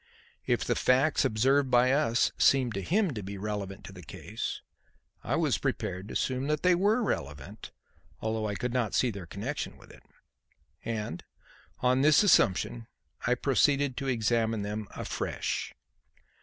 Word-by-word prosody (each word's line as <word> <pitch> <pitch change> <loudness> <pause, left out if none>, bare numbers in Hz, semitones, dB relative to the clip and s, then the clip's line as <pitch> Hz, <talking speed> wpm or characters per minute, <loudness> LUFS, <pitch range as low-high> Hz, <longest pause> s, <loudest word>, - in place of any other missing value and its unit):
If - - +1
the - - +1
facts 130 +4 +3
observed 135 +5 +2
by 125 +1 +4
us 135 -5 +2
seemed 130 -4 +3
to 100 - -3
him 190 - +1
to 105 - -5
be 100 +1 -7
relevant 100 -1 -5
to 95 - -10
the 90 - -11
case, - - -6 0.6
I - - -1
was - - +1
prepared 95 +2 -3
to - - -8
assume 130 +1 -1
that 150 0 -1
they 180 0 +5
were 205 +7 +2
relevant, 75 - -4 0.5
although 110 0 -2
I 105 - -3
could 125 +3 -3
not 125 -4 0
see 125 - +2
their 100 -5 -8
connection 115 - -5
with - - -16
it. - - -16 0.8
And, 105 -7 -4 0.6
on 125 +1 +3
this 150 +6 +5
assumption, 115 - +3 0.4
I 125 - +3
proceeded 140 +1 +2
to 140 - -3
examine 115 -3 +1
them 105 +1 -4
afresh. - - -3
120 Hz, 155 wpm, -29 LUFS, 105-140 Hz, 0.8 s, they